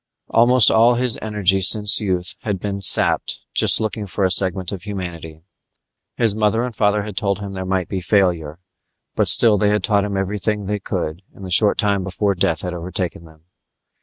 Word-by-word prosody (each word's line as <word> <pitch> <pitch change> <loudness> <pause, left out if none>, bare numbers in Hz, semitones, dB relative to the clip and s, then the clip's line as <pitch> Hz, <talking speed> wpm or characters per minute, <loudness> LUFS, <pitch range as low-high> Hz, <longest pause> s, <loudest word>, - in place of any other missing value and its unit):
Almost 120 +1 +4
all 115 +2 +4
his 125 -1 0
energy 100 -3 0
since 105 +3 +4
youth 90 -3 -1
had 105 -3 -4
been 100 +1 -5
sapped - - +1
just - - +4
looking 110 -1 -4
for 100 +1 -3
a 95 - +1
segment 95 -1 +1
of 100 -3 -7
humanity. 85 -5 -8 0.7
His 115 -4 +3
mother 110 +2 0
and 125 -2 -6
father 105 -1 0
had 105 -2 -8
told 100 -2 -1
him 100 -1 -7
there 95 -1 -6
might 95 -2 -2
be 95 -2 -5
failure, 85 -5 0 0.6
but - - 0
still 110 -4 +5
they 105 - +1
had 105 -2 -1
taught 100 -1 +1
him 100 -1 -4
everything 105 +2 -2
they 105 +1 -3
could 80 -2 -5
in 100 - -13
the 95 - -8
short 105 +3 +3
time 100 -3 0
before 100 +2 -2
death 85 -3 -1
had 90 -1 -5
overtaken 90 0 -5
them. 80 -1 -20
100 Hz, 190 wpm, -19 LUFS, 90-105 Hz, 0.7 s, still